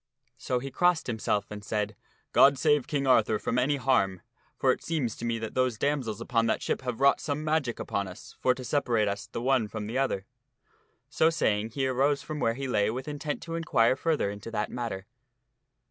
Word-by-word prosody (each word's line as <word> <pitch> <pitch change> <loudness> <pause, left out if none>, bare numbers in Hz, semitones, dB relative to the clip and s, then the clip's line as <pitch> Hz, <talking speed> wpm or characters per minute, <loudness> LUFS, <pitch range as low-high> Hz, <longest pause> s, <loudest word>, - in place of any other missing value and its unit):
So 125 - -1
he 135 +2 -5
crossed 175 +3 +2
himself 110 -3 -1
and 105 0 -7
said, 105 0 -2 0.2
" - - -41
God 140 0 +6
save 150 -1 +2
King 145 -3 -1
Arthur 110 -4 +4
from 120 +3 -1
any 140 +4 +2
harm, 100 -9 +1 0.4
for - - +3
it - - -3
seems 145 -9 -1
to 120 - -5
me 115 -1 0
that 110 -1 -5
those 130 -3 +1
damsels 130 -5 -1
upon 115 -1 +1
that - - +1
ship - - -1
have 125 -2 -4
wrought 140 0 +4
some 150 0 -2
magic 155 -6 0
upon 100 -1 -2
us 90 - -11
for 125 -1 +3
to 130 - -8
separate 120 -5 +1
us 100 0 -3
the 115 - -5
one 130 -4 +2
from 105 0 -5
the 115 +5 -2
other." 100 -8 -1 0.8
So 160 - +3
saying, 110 -9 0
he 135 -2 0
arose 140 +2 +1
from 155 -1 -5
where 115 -3 +1
he 135 +1 -4
lay 105 -4 +2
with 130 +5 -4
intent 145 0 -4
to 165 - -6
inquire 130 -8 +2
further 150 -9 0
into 100 +2 -8
that 105 -2 -2
matter. 115 -6 -4
125 Hz, 210 wpm, -28 LUFS, 110-140 Hz, 0.8 s, God